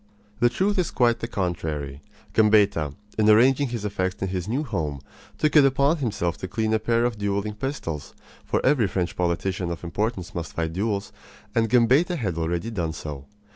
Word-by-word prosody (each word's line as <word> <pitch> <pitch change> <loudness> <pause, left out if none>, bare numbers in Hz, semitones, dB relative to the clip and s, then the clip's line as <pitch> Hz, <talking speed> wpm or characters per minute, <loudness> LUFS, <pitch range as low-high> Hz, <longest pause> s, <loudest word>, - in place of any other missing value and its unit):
The 120 - +5
truth 195 +9 0
is 175 - +1
quite 120 -2 +2
the 115 - -3
contrary. 80 - -3 0.3
Gambetta, 100 -9 +3 0.2
in 110 0 +4
arranging 130 +6 +5
his 115 -4 -4
effects 95 -2 -2
in 95 - -1
his 90 -1 -3
new 130 +7 -1
home, 80 - -3 0.4
took 155 0 +1
it 150 - +8
upon 140 +4 +3
himself 100 - -1
to 95 - -5
clean 110 +2 -1
a 110 - +3
pair 115 +1 +1
of 120 -3 -2
dueling 100 +1 -1
pistols; 105 - -5 0.3
for - - -1
every 130 -6 +4
French 90 -1 -2
politician 90 +1 -1
of 85 0 -5
importance 95 +2 -3
must 85 -4 -5
fight 80 -1 -2
duels, 100 +1 -2 0.4
and 115 -1 +2
Gambetta 130 - +4
had 100 - -2
already 85 +6 -2
done 85 -7 -2
so. 75 -4 -7
105 Hz, 180 wpm, -25 LUFS, 85-120 Hz, 0.4 s, it